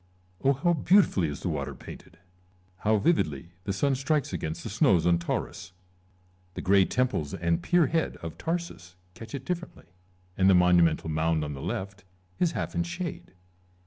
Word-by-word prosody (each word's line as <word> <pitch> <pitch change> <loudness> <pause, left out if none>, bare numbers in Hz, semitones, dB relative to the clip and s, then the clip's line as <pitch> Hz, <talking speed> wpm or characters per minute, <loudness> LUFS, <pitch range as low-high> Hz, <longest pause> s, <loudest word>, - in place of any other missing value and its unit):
Coisar. 135 - +3
Oh - - +5
how 175 - +4
beautifully 165 - +3
is 70 -1 -6
the - - -2
water - - -3
painted! 85 - -12 0.7
Hovv 105 -1 +2
vividly 80 - +1
the 100 - -1
sun 135 +8 +1
strikes 140 -1 0
against 80 -2 -4
the - - -5
snows 85 - +3
on 85 -1 +3
Taurus! 85 +1 -4 0.8
The - - -4
grey 95 0 +5
temples 125 - -1
and 85 -2 0
pier 175 -2 +3
head 160 +3 -1
of 85 -1 -7
Tarsus 165 - -4 0.2
catch 115 +7 -9
it 135 -1 -7
differently, 175 - -5 0.5
and 95 0 +4
the 95 - +6
monumental 90 -3 +4
mound 80 0 +1
on 75 0 -4
the 70 - -8
left 95 +5 -5 0.4
is 175 -2 +2
half - - -3
in - - 0
shade. 170 - -5
95 Hz, 175 wpm, -27 LUFS, -, 0.8 s, the